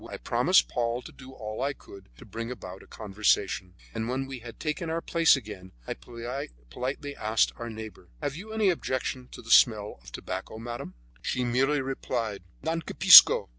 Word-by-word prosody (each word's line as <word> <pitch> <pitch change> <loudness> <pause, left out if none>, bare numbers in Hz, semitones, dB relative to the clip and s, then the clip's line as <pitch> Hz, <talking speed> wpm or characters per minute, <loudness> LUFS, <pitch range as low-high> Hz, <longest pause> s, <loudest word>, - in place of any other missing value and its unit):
I - - -6
promised 65 -2 +3
Paul 120 - -2
to - - -11
do 130 -1 -13
all 110 -3 -6
I 140 +1 0
could 100 -7 -15
to - - -13
bring 115 +1 -6
about 95 -6 -8
a - - -17
conversation, 95 -3 -1 0.2
and 115 +1 -3
when 130 +2 -2
we 135 -1 -7
had 115 0 -11
taken 155 +2 -3
our 165 +1 -1
places 165 -1 +4
again, 105 -7 -9
I - - -3
politely 120 - -7
asked 110 +1 +1
our 120 -1 -6
neighbor: 110 -1 -10
"Have 145 - -3
you 205 +7 -9
any 220 -3 +2
objection 130 -5 -3
to - - -12
the 115 - -7
smell 105 -4 +4
of - - -14
tobacco, - - -6
madame?" 120 -4 -7 0.3
She 125 - -2
merely 135 +4 +1
replied, 120 -5 -3 0.2
"Non 165 +1 -1
capisco." - - +8
120 Hz, 180 wpm, -27 LUFS, 110-135 Hz, 0.3 s, capisco